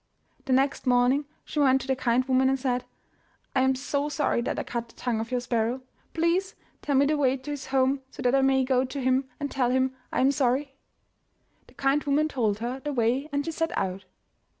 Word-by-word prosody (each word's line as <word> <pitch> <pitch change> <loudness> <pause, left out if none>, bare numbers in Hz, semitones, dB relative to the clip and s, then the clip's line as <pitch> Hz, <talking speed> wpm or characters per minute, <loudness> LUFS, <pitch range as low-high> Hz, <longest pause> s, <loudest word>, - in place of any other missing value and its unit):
The 260 - +1
next 270 +1 +1
morning 250 +3 +3 0.2
she 300 - -3
went 265 -2 +4
to - - -8
the 265 - +1
kind 255 -1 +1
woman 260 0 +3
and 270 0 0
said, 250 -1 -1 0.7
I 260 - +4
am 265 0 +3
so 280 +2 -2
sorry 295 -5 0
that - - -2
I - - -1
cut 235 -1 -4
the - - -19
tongue 240 -3 -2
of 225 +1 -4
your 250 -1 -1
sparrow. 240 +1 -1 0.3
Please 340 +4 +1 0.3
tell 285 - -1
me 275 +1 +5
the 300 +1 +1
way 265 -2 +2
to 280 +3 -7
his 285 -2 -5
home 265 0 +2
so - - -9
that 250 0 +2
I 275 - +4
may 265 0 +3
go 255 0 +2
to 265 +2 -5
him 260 +1 +1
and 285 -1 -3
tell 255 -3 +1
him 260 +1 +1 0.2
I - - 0
am 270 +2 +4
sorry." 270 +1 0 0.9
The - - -20
kind 275 +2 +1
woman 295 +2 +2
told 220 -8 0
her 240 +4 -4
the 295 +2 -4
way 255 +3 0
and 285 0 -1
she 330 - -2
set 325 +1 -2
out. 190 0 -2
265 Hz, 225 wpm, -26 LUFS, 250-280 Hz, 0.9 s, me